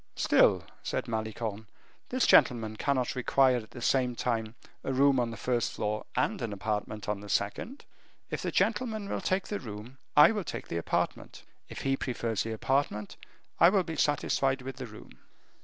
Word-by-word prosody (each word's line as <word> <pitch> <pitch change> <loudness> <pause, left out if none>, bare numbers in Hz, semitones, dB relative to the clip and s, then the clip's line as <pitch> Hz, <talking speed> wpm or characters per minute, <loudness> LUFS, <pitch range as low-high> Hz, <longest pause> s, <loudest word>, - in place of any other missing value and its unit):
"Still," - - +4 0.2
said - - -3
Malicorne, 110 -1 -4 0.4
"this 255 0 +1
gentleman 110 -3 +4
cannot 130 +1 0
require 130 0 +3
at 110 -2 -7
the 120 - -9
same 125 -2 +2
time 115 -2 -2 0.3
a - - -2
room 135 0 +4
on 120 -1 0
the 115 - -7
first 120 -2 0
floor 105 0 -3
and - - 0
an 115 -3 -3
apartment 105 0 -3
on 105 -1 -1
the 105 0 -10
second. 105 - -2 0.5
If - - -2
this - - -2
gentleman 220 -5 0
will - - -3
take 190 0 -1
the 205 - -2
room, 110 +3 -9 0.2
I 150 - +9
will 210 -3 -2
take - - -6
the 85 - -2
apartment: 85 - -2 0.3
if - - -7
he 135 0 +2
prefers 120 -5 -2
the 115 - -3
apartment, 110 -2 -1 0.4
I 170 - +8
will 190 -1 +3
be 165 -2 -5
satisfied 135 -3 +1
with 135 +1 -6
the 130 -2 -6
room." 110 - -14
125 Hz, 180 wpm, -29 LUFS, 110-135 Hz, 0.5 s, I